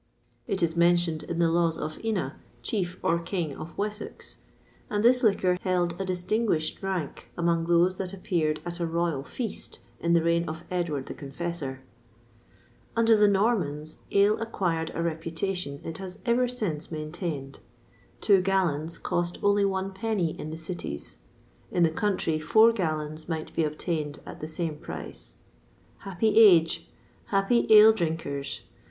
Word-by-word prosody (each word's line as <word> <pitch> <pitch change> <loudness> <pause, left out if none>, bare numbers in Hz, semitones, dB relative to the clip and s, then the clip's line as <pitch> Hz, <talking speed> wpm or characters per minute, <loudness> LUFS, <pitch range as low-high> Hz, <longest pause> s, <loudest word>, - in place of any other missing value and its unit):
It 190 -2 -1
is 165 -1 +1
mentioned 170 -2 +3
in 170 - -5
the 170 -1 +3
laws 165 -1 +2
of 155 +5 -5
Ina, 225 -1 -1 0.3
Chief, 185 -6 -2
or 170 +1 +2
King, 170 -4 -3
of 160 +1 -9
Wessex; 210 +1 -4 0.5
and 205 0 0
this 250 +1 +5
liquor 185 -5 +2
held 175 -1 0
a - - -1
distinguished 185 -2 0
rank 185 -6 -4
among 170 -1 +1
those 175 +2 +3
that 185 -2 -3
appeared 170 -6 -1
at 175 0 -4
a 170 - 0
royal 165 -3 0
feast 220 - -5 0.2
in 170 0 +1
the 170 -1 +4
reign 170 0 +1
of 160 +2 -6
Edward 165 -7 -1
the - - -6
Confessor.[XXVI 145 0 -4
20] 130 - -20 1.1
Under 230 -1 +5
the 210 -1 +5
Normans, 190 -8 0
ale 200 +2 +4
acquired 170 -8 -1
a 165 - -1
reputation 165 -1 -3
it 165 +1 -6
has 190 -1 -7
ever 245 +1 +3
since 200 -12 -3
maintained. 155 -3 -5 0.6
Two 195 -3 +5
gallons 170 -4 0
cost 175 0 -2
only 205 0 +4
one 190 0 -1
penny 195 -5 -1
in 155 - -5
the 160 - -5
cities; 160 - -6 0.5
in 175 - +2
the 165 - +4
country, 175 -4 0
four 220 +8 +6
gallons 155 -6 -3
might 160 -2 -4
be 165 - +2
obtained 155 -1 -2
at - - -9
the 155 - -4
same 160 -1 -3
price. - - -9 0.6
Happy 200 +3 +1
age! 175 -7 +6 0.4
happy 195 +4 +2
ale 215 0 +9
drinkers! 160 -7 -3
175 Hz, 155 wpm, -27 LUFS, 160-195 Hz, 1.1 s, ale